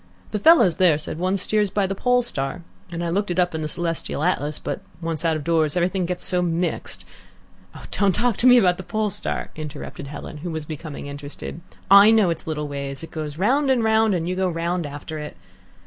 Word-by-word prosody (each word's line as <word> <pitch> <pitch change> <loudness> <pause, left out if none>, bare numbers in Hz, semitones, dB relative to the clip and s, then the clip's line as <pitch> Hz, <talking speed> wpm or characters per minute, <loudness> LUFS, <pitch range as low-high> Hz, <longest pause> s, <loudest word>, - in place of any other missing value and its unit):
The 210 - -1
fellows 230 - +6
there 175 -5 +4
said 155 +1 -6
one 185 +2 +1
steers 210 +1 +1
by 200 0 0
the 195 - -2
Pole 250 +4 +2
Star, 170 - -2 0.3
and 170 0 -4
I 170 - -1
looked 200 +4 0
it 175 - -2
up 180 -1 +2
in 160 - -3
the 155 - -2
celestial 165 -2 -3
atlas, 150 -4 0
but - - -5 0.2
once 165 -2 -4
out 165 -1 +2
of 155 - -4
doors 160 -1 +1
everything 180 +1 0
gets 180 0 -2
so 180 -1 +1
mixed 170 0 -2 0.4
" - - -16
"Don't 200 -3 +2
talk 240 -3 +1
to 250 - +4
me 250 0 +8
about 180 -6 +4
the - - -6
Pole 215 +2 -1
Star," - - -3
interrupted 150 -2 -7
Helen, 150 +1 -8
who 170 +4 -6
was 160 -2 -4
becoming 155 -1 -7
interested. 145 +3 -8 0.3
"I 200 +2 +9
know 215 -6 +4
its 165 - -5
little 150 -2 -2
ways. 140 0 -5
It 165 - -9
goes 155 -2 -5
round 265 - +2
and 255 -3 +3
round, 220 -2 +3
and 165 -1 -2
you 180 - -1
go 185 0 +1
round 170 0 -2
after 145 +2 -7
it." 150 0 -8
175 Hz, 225 wpm, -23 LUFS, 155-195 Hz, 0.4 s, I